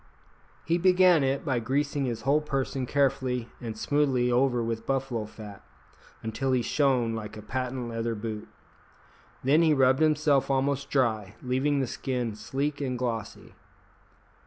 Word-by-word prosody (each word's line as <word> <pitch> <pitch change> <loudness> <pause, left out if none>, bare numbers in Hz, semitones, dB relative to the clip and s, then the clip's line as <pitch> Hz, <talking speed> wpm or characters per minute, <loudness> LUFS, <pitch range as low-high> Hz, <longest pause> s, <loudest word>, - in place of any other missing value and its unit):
He 170 +2 +1
began 180 -3 +5
it 135 +2 0
by 130 -5 +1
greasing 140 +4 -1
his 115 -2 -3
whole 140 +4 +3
person 135 -3 -2
carefully 130 -4 0
and 115 -3 -5
smoothly 130 -2 +1
over 125 -1 +2
with 115 -1 -4
buffalo 130 -5 -1
fat, 105 -2 -11 0.6
until 120 +4 -1
he 125 -2 +2
shone 130 -6 +1
like 110 -1 -6
a - - -7
patent 125 +1 -3
leather 115 0 -2
boot; 110 0 -5 1.0
then 145 +5 +4
he 160 -2 +4
rubbed 130 +1 +4
himself 150 -3 +3
almost 135 +1 0
dry, 110 -7 0
leaving 135 +3 +1
the - - +1
skin 125 -2 -3
sleek 140 +6 -3
and 130 -3 -2
glossy. 115 -4 -4
130 Hz, 145 wpm, -27 LUFS, 115-140 Hz, 1.0 s, began